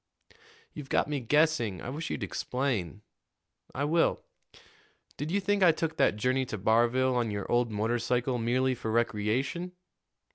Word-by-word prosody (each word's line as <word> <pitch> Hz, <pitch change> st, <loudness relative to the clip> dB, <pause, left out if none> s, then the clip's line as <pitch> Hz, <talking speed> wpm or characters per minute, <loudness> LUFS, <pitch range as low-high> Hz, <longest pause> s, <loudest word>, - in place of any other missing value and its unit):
"You've 145 Hz, -3 st, -9 dB
got -, -, +2 dB
me 145 Hz, -1 st, -2 dB
guessing. 130 Hz, -, +1 dB
I 120 Hz, -, -6 dB
wish 160 Hz, +4 st, -5 dB
you'd -, -, -3 dB
explain." 110 Hz, -, -2 dB, 0.7 s
"I 140 Hz, -, -1 dB
will. 165 Hz, +3 st, +1 dB, 0.9 s
Did 145 Hz, +2 st, -4 dB
you 195 Hz, +4 st, +1 dB
think 200 Hz, +1 st, 0 dB
I 180 Hz, -3 st, +7 dB
took 160 Hz, 0 st, -3 dB
that -, -, +3 dB
journey 130 Hz, +5 st, +1 dB
to 110 Hz, -, -4 dB
Barville 120 Hz, +5 st, +2 dB
on 120 Hz, -2 st, 0 dB
your 100 Hz, -2 st, -4 dB
old 120 Hz, 0 st, +2 dB
motorcycle 120 Hz, +3 st, 0 dB
merely 130 Hz, +3 st, +1 dB
for 115 Hz, -2 st, -5 dB
recreation?" 120 Hz, -, -1 dB
125 Hz, 150 wpm, -29 LUFS, 115-150 Hz, 0.9 s, I